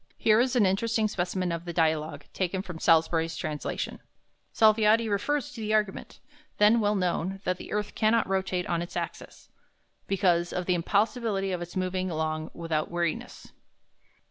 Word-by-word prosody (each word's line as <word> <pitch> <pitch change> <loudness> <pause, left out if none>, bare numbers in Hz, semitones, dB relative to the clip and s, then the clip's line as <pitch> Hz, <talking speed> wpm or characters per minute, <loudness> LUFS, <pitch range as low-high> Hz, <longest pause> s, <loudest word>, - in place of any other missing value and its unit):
Here 215 0 +4
is 255 +1 +2
an 230 -5 +4
interesting 220 +3 +1
specimen 180 -2 -2
of 170 0 -3
the 170 - -5
"Dialogue" 155 -3 0
taken 185 0 -2
from 180 -4 -8
Salusbury's 165 0 +3
translation: 150 -1 -4 0.5
Salviati 220 +1 +4
refers 235 +8 -1
to 230 - -8
the 215 0 +1
argument, 210 -3 -2 0.4
then 210 +3 +5
well 210 -1 +1
known, 185 0 -1
that 185 0 -1
the - - -10
earth 210 0 -2
cannot 225 +1 +2
rotate 190 -1 -1
on 170 -1 -1
its 175 - -6
axis, - - -6 0.6
"because 175 -3 +2
of 180 - -2
the 180 - +2
impossibility 200 +2 0
of 180 -1 -3
its 175 0 -7
moving 185 0 -1
long 155 -1 -2
without 165 -2 -2
wearinesse." 170 -2 -3
185 Hz, 160 wpm, -27 LUFS, 170-210 Hz, 0.6 s, then